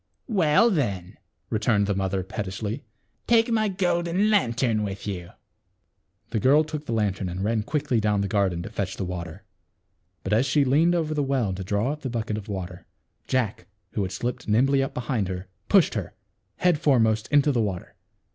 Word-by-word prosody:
" - - -49
Well, 160 +10 +5
then," 100 - -2 0.3
returned 110 -2 +2
the 100 - 0
mother 95 -1 -1
pettishly, 105 +6 -4 0.4
"take 230 0 +4
my 220 -1 +2
golden 180 +1 +1
lantern 120 - +2
with 100 -1 -4
you." 90 -4 -5 1.0
The 115 - 0
girl 140 +8 +5
took 155 -1 -6
the - - -3
lantern 100 -4 0
and 90 +2 -4
ran 110 +1 +1
quickly 140 +1 0
down 105 -1 +1
the 100 - 0
gar 100 -1 +2
den 85 -1 -4
to 105 - -8
fetch 100 -3 -3
the 95 - -2
water. 90 0 -6 0.8
But 95 - -1
as 120 +6 +3
she 140 +2 +3
leaned 160 +7 +3
over 160 -2 0
the 150 - 0
well 135 -8 0
to 95 +1 -5
draw 100 +7 0
up 150 0 -6
the 130 - -3
bucket 110 -3 -2
of 105 - -12
water, 90 -3 -6 0.4
Jack, 125 -6 -1 0.2
who 105 - -2
had 95 -1 -2
slipped 120 +6 -4
nimbly 135 +6 +3
up 135 - -3
behind 115 -5 -1
her, 90 0 -5 0.2
pushed - - +5
her, - - -4 0.4
head 175 -4 +2
foremost, 110 -7 +2
into 145 0 +4
the 120 -4 +1
water. 100 -5 -3
110 Hz, 190 wpm, -25 LUFS, 100-145 Hz, 1.0 s, Well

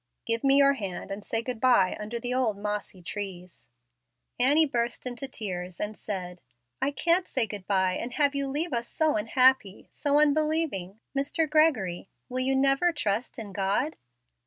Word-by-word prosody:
Give 230 0 -1
me 275 0 +5
your 280 0 +6
hand, 195 -6 -6
and 200 +1 -5
say 225 +2 -2
good 245 -1 -4
by 230 -7 +4
under 215 +3 -4
the 245 +1 -3
old 245 -5 +1
mossy 205 -3 -4
trees." 180 -2 -7 0.7
Annie 290 +6 +5
burst 240 -4 -2
into 250 +2 -5
tears 185 -7 -5
and 210 +1 -3
said, 180 -4 -6 0.4
"I - - +2
can't 340 +5 +1
say 255 -4 0
good 200 -3 -8
by 190 -2 +2
and 245 +1 -5
have 290 -2 +2
you 280 -1 -1
leave 295 +3 -2
us 235 0 -1
so 315 -1 +1
unhappy 225 -1 +2
so 290 0 +2
unbelieving. 300 - +1 0.2
Mr. 285 +4 0
Gregory, 280 - +2 0.2
will 255 +1 -2
you 265 +1 +1
never 275 +6 +3
trust 235 -7 -2
in 210 -4 -7
God?" 205 +10 0
240 Hz, 170 wpm, -27 LUFS, 200-280 Hz, 0.7 s, your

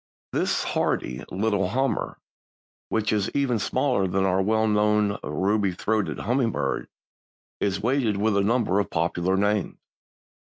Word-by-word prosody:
_) - - -81
This - - 0
hardy 65 +2 -1
little 100 -1 0
"Hummer," 135 +5 -1 0.7
which 110 -1 0
is 105 -2 0
even 135 -5 +1
smaller 105 -3 +1
than 95 +1 0
our 95 0 +2
well 110 +2 +2
known 105 -1 +2
ruby 100 -1 0
throated 110 +3 -1
hummingbird, 120 -2 0 0.7
is 100 0 -1
weighted 120 -4 +1
with 105 +1 +1
a 100 - +3
number 105 -2 +2
of 100 - -1
popular 85 +3 0
names. 105 0 0
105 Hz, 135 wpm, -25 LUFS, 95-110 Hz, 0.7 s, a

